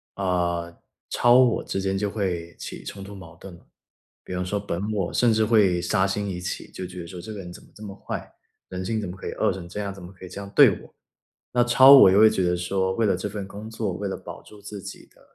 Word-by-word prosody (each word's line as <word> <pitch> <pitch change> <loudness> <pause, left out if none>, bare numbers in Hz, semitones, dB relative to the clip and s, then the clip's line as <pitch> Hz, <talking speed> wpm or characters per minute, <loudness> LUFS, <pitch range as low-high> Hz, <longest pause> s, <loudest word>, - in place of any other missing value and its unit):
啊， 85 -3 -1 0.4
超 120 0 +4
我 125 -3 +4
之 95 - -3
间 95 0 -1
就 100 +1 -1
会 90 -5 -3
起 - - -8
冲 100 -1 -8
突 100 - -10
矛 90 -4 -12
盾 90 +1 -12
了。 85 - -21 0.6
比 - - -8
方 90 0 -2
说 100 +3 -2
本 100 +1 -4
我 95 -5 -2
甚 120 -2 +3
至 110 0 +2
会 100 -6 +3
杀 95 +2 +1
心 100 +1 -2
一 90 -2 -5
起， 90 - -5
就 95 - -6
觉 90 0 -9
得 85 - -7
说 90 -1 -8
这 110 - -8
个 105 - -7
人 90 -2 -8
怎 - - -12
么 - - -21
这 110 - -12
么 100 -2 -8
坏， - - -6 0.4
人 95 0 -5
性 110 +3 -2
怎 105 - -4
么 90 - -7
可 - - -8
以 - - -4
恶 - - +1
成 85 -3 -9
这 95 - -6
样， 100 -2 -3
怎 95 -2 -12
么 90 - -10
可 95 -1 -12
以 - - -10
这 100 - -7
样 100 0 -9
对 - - +8
我， - - -17 0.6
那 120 - +4
超 130 +3 +7
我 135 -9 +10
就 95 - +4
会 110 +1 +8
觉 95 - -1
得 90 0 +1
说 95 +1 -1
为 115 - +1
了 100 - +2
这 105 - -4
份 100 -1 -5
工 105 +2 -9
作， 110 -4 -3
为 100 +3 -4
了 95 - -4
保 - - -10
住 105 - -16
自 105 -1 -8
己 - - -10
的 - - -25
95 Hz, 295 characters per minute, -24 LUFS, 90-105 Hz, 0.6 s, 我